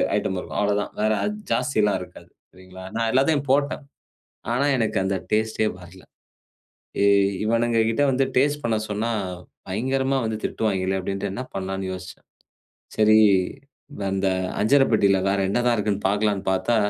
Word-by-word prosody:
Item 95 - -1
இருக்கும் - - -7
அவ்வளவுதான் 105 0 0
வேற 110 0 +2
அது 210 - -1 0.2
ஜாஸ்தி 125 -1 0
எல்லாம் 105 -3 +2
இருக்காது" 90 - -12 0.2
சரிங்களா? 95 0 -13
நான் 115 -1 0
எல்லாத்தையும் 140 +2 +2
போட்டேன். 140 +2 +1 0.7
ஆனா 140 +4 +1
எனக்கு 110 -5 0
அந்த 95 0 0
டேஸ்ட்டே 110 0 +1
வரல. 90 +1 -14 1.0
"ஏ 100 - +4 0.4
இவனுங்க 115 +1 +1
கிட்ட 115 +5 0
வந்து 135 +1 +2
டேஸ்ட் 145 +3 +2
பண்ண 115 -2 +1
சொன்னா 105 +3 -1 0.6
பயங்கரமா 130 +7 0
வந்து 110 -1 -2
திட்டுவாய்ங்களே!" 95 -3 -1
அப்டின்ட்டு 100 +1 -3
என்ன 125 - -4
பண்ணலாம்ன்னு 95 0 -4
யோசிச்சேன். 90 0 -10 0.7
சரி, 110 0 +5 0.9
அந்த 95 0 0 0.3
அஞ்சரப்பட்டியில 110 -5 +4
வேற 100 0 +1
என்னதான் 120 +2 +2
இருக்குதுன்னு 105 -2 -1
பார்க்கலாம்ன்னு 105 -1 0
பார்த்தா, 115 +5 +1
110 Hz, 140 wpm, -23 LUFS, 95-120 Hz, 1.0 s, சரி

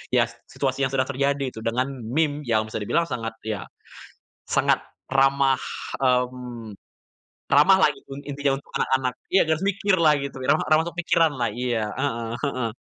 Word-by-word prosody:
ya - - +5
s - - -14 0.2
situasi 135 0 0
yang - - -9
sedang 130 -1 +1
terjadi 140 -1 0
gitu, 110 - -9
dengan 125 +3 0 0.2
meme 150 +2 0
yang 110 -2 +2
bisa 110 - -4
dibilang 165 +11 +1
sangat 115 -2 -4
ya, 110 -2 -4 0.8
sangat - - +2 0.3
ramah, 135 0 +3 0.4
mmm, 125 -3 -1 0.8
ramahlah - - +6 0.2
un 135 - -6
intinya 140 -1 0
untuk 140 - -15
anak-anak. 130 -2 +1 0.2
Ya 190 - +4
nggak 160 - +2
harus 195 - -1
mikirlah 185 -5 +3
gitu, 140 - -7
ramah 155 +4 +2
ramah 155 +1 +5
untuk 170 - -17
pikiranlah. 145 -9 +2
Iya, 120 -2 -1 0.2
heeh 115 -4 -2
heeh. 125 -5 -2
135 Hz, 160 wpm, -24 LUFS, 125-145 Hz, 0.8 s, ramahlah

